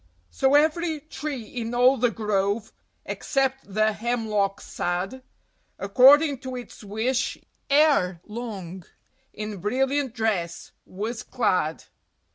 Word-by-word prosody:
So 270 Hz, +1 st, +3 dB
every 315 Hz, +1 st, +2 dB
tree 290 Hz, -4 st, -5 dB
in 230 Hz, +1 st, -5 dB
all 250 Hz, +2 st, +5 dB
the 245 Hz, -1 st, +2 dB
grove, 210 Hz, 0 st, -1 dB, 0.3 s
except 270 Hz, -5 st, -1 dB
the 215 Hz, +2 st, +2 dB
Hemlock 215 Hz, -4 st, -1 dB
sad, 185 Hz, +9 st, -3 dB, 0.6 s
According 270 Hz, +7 st, +6 dB
to 260 Hz, 0 st, -6 dB
its 245 Hz, -2 st, -9 dB
wish 220 Hz, +5 st, -1 dB, 0.3 s
ere 280 Hz, -, +4 dB
long 200 Hz, -6 st, -7 dB, 0.5 s
in 210 Hz, -1 st, -6 dB
brilliant 265 Hz, +5 st, 0 dB
dress 195 Hz, -7 st, -2 dB, 0.2 s
was 220 Hz, +5 st, -4 dB
clad. 185 Hz, -9 st, 0 dB
230 Hz, 105 wpm, -25 LUFS, 205-265 Hz, 0.6 s, According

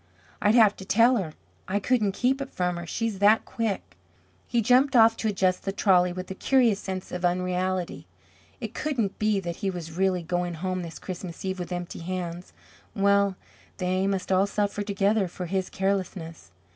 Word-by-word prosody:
I'd 210 Hz, +2 st, +4 dB
have 215 Hz, -4 st, +6 dB
to -, -, -8 dB
tell 230 Hz, +6 st, +4 dB
her. 165 Hz, -7 st, -4 dB, 0.3 s
I 195 Hz, +2 st, 0 dB
couldn't 215 Hz, -3 st, +1 dB
keep 260 Hz, +6 st, +1 dB
it 275 Hz, -, -4 dB
from 180 Hz, -1 st, -1 dB
her, 170 Hz, 0 st, -6 dB
she's 225 Hz, +2 st, -2 dB
that 210 Hz, +2 st, +5 dB
quick." 215 Hz, -, -3 dB, 0.5 s
He 240 Hz, -, +1 dB
jumped 255 Hz, +4 st, +4 dB
off 225 Hz, -1 st, +7 dB
to 225 Hz, -, -1 dB
adjust 190 Hz, -3 st, +1 dB
the 195 Hz, -, -2 dB
trolley 185 Hz, -3 st, +3 dB
with 185 Hz, +1 st, -6 dB
a -, -, -2 dB
curious 235 Hz, -1 st, +3 dB
sense 190 Hz, -2 st, -5 dB
of 180 Hz, 0 st, -5 dB
unreality. 180 Hz, 0 st, -1 dB, 0.5 s
It -, -, -6 dB
couldn't 245 Hz, -10 st, -2 dB
be 215 Hz, -2 st, +2 dB
that 170 Hz, -2 st, -5 dB
he 200 Hz, -, -1 dB
was 175 Hz, -3 st, -6 dB
really 185 Hz, -1 st, +1 dB
going 175 Hz, +1 st, -2 dB
home 185 Hz, +2 st, -2 dB
this 165 Hz, -2 st, -7 dB
Christmas 180 Hz, -1 st, -7 dB
Eve 190 Hz, 0 st, -2 dB
with 175 Hz, 0 st, -5 dB
empty 175 Hz, -1 st, -5 dB
hands. 175 Hz, 0 st, -5 dB, 0.4 s
Well, 200 Hz, 0 st, +3 dB, 0.4 s
they 185 Hz, +1 st, 0 dB
must 195 Hz, -1 st, -2 dB
all 190 Hz, +1 st, +4 dB
suffer 205 Hz, 0 st, -1 dB
together 200 Hz, 0 st, +1 dB
for 180 Hz, +1 st, -6 dB
his 190 Hz, +1 st, -2 dB
carelessness. 185 Hz, -, -3 dB
190 Hz, 185 wpm, -26 LUFS, 180-210 Hz, 0.5 s, off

